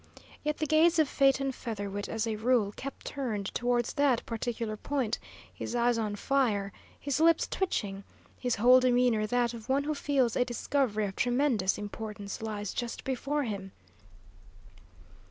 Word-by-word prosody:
Yet 300 0 -1
the 310 - -1
gaze 320 +3 +4
of 315 -2 +4
Phaeton 275 0 +2
Featherwit 205 -5 -5
as 225 0 -1
a 225 -1 -1
rule 220 -2 +2
kept 275 +1 -7
turned 220 -8 -3
towards 240 -1 0
that 280 -5 +2
particular 230 -1 -3
point, 255 0 -2 0.3
his - - -5
eyes 240 -1 +2
on 210 -2 -1
fire, 210 -5 0 0.3
his 285 0 -1
lips 330 0 +4
twitching, 200 - -2 0.4
his 245 -2 0
whole 250 +4 +7
demeanour 245 -4 +3
that 240 +1 +1
of 230 +1 -10
one 275 +2 +2
who 305 +1 -1
feels 275 -5 +1
a - - +3
discovery 240 -3 0
of 195 -1 -5
tremendous 245 -6 +1
importance 205 -1 -6
lies 210 -2 -4
just 240 -1 -4
before 275 +3 -1
him. 195 -5 -5
240 Hz, 155 wpm, -30 LUFS, 215-275 Hz, 0.4 s, whole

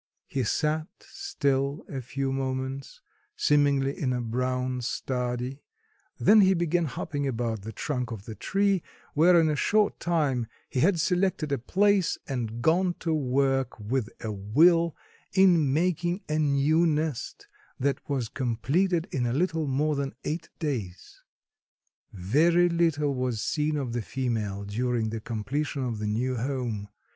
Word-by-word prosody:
He 135 - -2
sat 155 +6 0
still 140 - -2
a 135 -2 -5
few 135 +2 -3
moments, 130 0 -4 0.3
seemingly 140 -2 +2
in 130 -3 -1
a 125 - -1
brown 125 +2 -1
study, 125 +2 -3 0.6
then 215 0 +6
he 190 -1 +5
began 170 0 +1
hopping 145 +1 -3
about 115 -4 -2
the 110 +3 -7
trunk 125 +1 -3
of 110 -4 -7
the 110 - -6
tree, 195 - +1 0.3
where 170 +3 +6
in 160 - +4
a 155 - +1
short 210 +6 +2
time 145 -9 0 0.2
he 130 - -1
had 170 +4 +3
selected 180 -3 +1
a 140 - +1
place 195 - +2
and 120 -3 -3
gone 175 +3 +3
to 165 -2 0
work 135 -3 +1
with 110 +2 -2 0.2
a 110 - -2
will 160 - +3 0.4
in 175 -7 +5
making 175 +4 0
a 155 +1 0
new 150 +3 +3
nest, 150 -5 -2 0.3
that 140 0 0
was 130 -5 -1
completed 135 - 0
in 125 -3 0
a 120 - -1
little 160 0 0
more 145 +3 +1
than 140 -3 -3
eight 160 +2 -3
days. 115 - -5 0.9
Very 160 - +3
little 160 -4 +1
was 125 -3 -1
seen 150 +5 0
of 130 -5 -3
the 120 - -1
female 110 -5 -2
during 115 +2 -1
the 110 -1 -4
completion 135 +6 -3
of 120 -4 -3
the 105 - -2
new 125 +4 -1
home. 120 -5 -3
140 Hz, 150 wpm, -27 LUFS, 125-160 Hz, 0.9 s, then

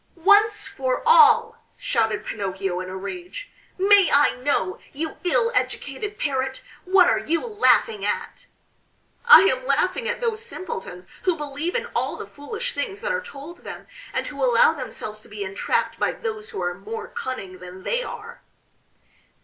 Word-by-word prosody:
"Once 410 +5 +4
for 260 -1 -2
all," 465 -1 +6
shouted 225 - 0
Pinocchio 195 -3 -3
in 185 0 -5
a 190 - -6
rage, 360 - -7 0.3
"may 390 -1 +5
I 290 +1 +5
know, 250 -8 -1
you 315 +3 -4
ill 460 +6 +2
educated 405 +10 -2
Parrot, 265 -4 -2 0.2
what 370 0 +5
are - - +3
you 335 +7 -1
laughing 435 -1 +2
at?" - - -3 0.8
"I 480 - +11
am 260 -10 +2
laughing 365 - +1
at 480 - -2
those 455 -2 -2
simpletons 190 - -6 0.2
who 365 -2 +1
believe 295 +4 -4
in 485 0 0
all - - -1
the - - -7
foolish 440 +12 -5
things 415 -3 -4
that - - -1
are 485 0 -1
told 345 - -10
them, - - -9 0.3
and - - -2
who - - -5
allow - - +5
themselves 215 0 -7
to 230 - -17
be 210 -1 -5
entrapped 195 +1 -1
by - - +1
those 435 -1 -5
who 445 - -6
are 175 - -1
more 450 - -7
cunning 225 - -6
than 180 +1 -11
they 485 - 0
are." 475 0 -8
360 Hz, 165 wpm, -23 LUFS, -, 0.8 s, I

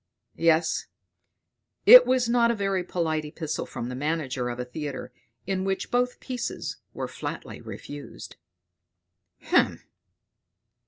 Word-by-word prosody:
Yes; 165 0 +2 1.0
it - - +11
was 255 -1 +2
not 235 0 +3
a 235 - +2
very 195 -3 0
polite 160 -3 -1
epistle 155 +1 -4
from 120 - -5
the 125 - -5
manager 135 -3 -2
of 120 0 -5
a 125 - -2
theatre, 140 -1 -6 0.3
in 190 0 -1
which 190 0 -2
both 245 0 +1
pieces 255 -2 -4
were - - -4
flatly - - -6
refused. 145 0 -9 1.1
"Hem! - - +2
165 Hz, 120 wpm, -26 LUFS, 145-230 Hz, 1.1 s, it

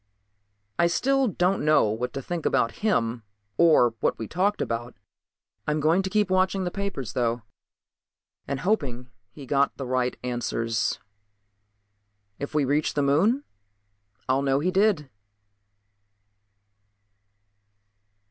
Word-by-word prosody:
I 170 - +5
still 270 +9 +2
don't 185 -1 0
know 155 -8 +4
what 120 +4 -3
to 135 - -5
think 175 +1 -4
about 115 -1 +1
him 120 - +1 0.3
or 150 -7 +5
what - - 0
we 110 - -5
talked 200 +4 0
about. 120 +1 -3 0.7
I'm 150 +1 +1
going 160 +5 +3
to 190 - -3
keep 210 -2 +1
watching 185 +1 +2
the 180 - -2
papers 190 - -4
though, 120 -2 -1 1.0
and 140 -1 -3
hoping 130 - -1 0.2
he 135 +6 -11
got 140 +1 +1
the 135 - -4
right 125 0 -1
answers. 115 -2 -1 1.4
If 140 +2 -6
we 150 -2 +3
reach 145 +3 0
the 145 - +1
Moon 195 - +2 0.8
I'll 130 +1 +2
know 135 0 +2
he 180 +5 0
did.... 190 -6 +2
145 Hz, 125 wpm, -25 LUFS, 125-185 Hz, 1.4 s, I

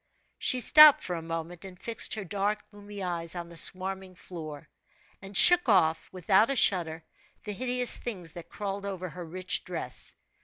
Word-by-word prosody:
She 255 - +3
stopped 305 +3 +8
for 180 - -4
a 165 - -5
moment, 165 +1 -7
and 185 -2 -12
fixed 230 0 -1
her 215 - -6
dark, 205 +3 -3
gloomy 205 -1 -10
eyes 170 -1 -3
on 170 -1 -7
the 170 - -13
swarming 185 +2 0
floor, 155 -5 -10 0.5
and 195 0 -4
shook 355 -6 +5
off, 165 -6 +2
with 185 -3 -12
out 210 +5 +5
a 275 - -1
shudder, 170 -8 +1 0.4
the 210 - -6
hideous 250 +2 -1
things 180 -9 -6
that 175 - -11
crawled 200 -1 -5
over 185 -2 -6
her 180 +2 -9
rich 185 +3 -3
dress. - - -2
185 Hz, 180 wpm, -28 LUFS, 170-205 Hz, 0.5 s, stopped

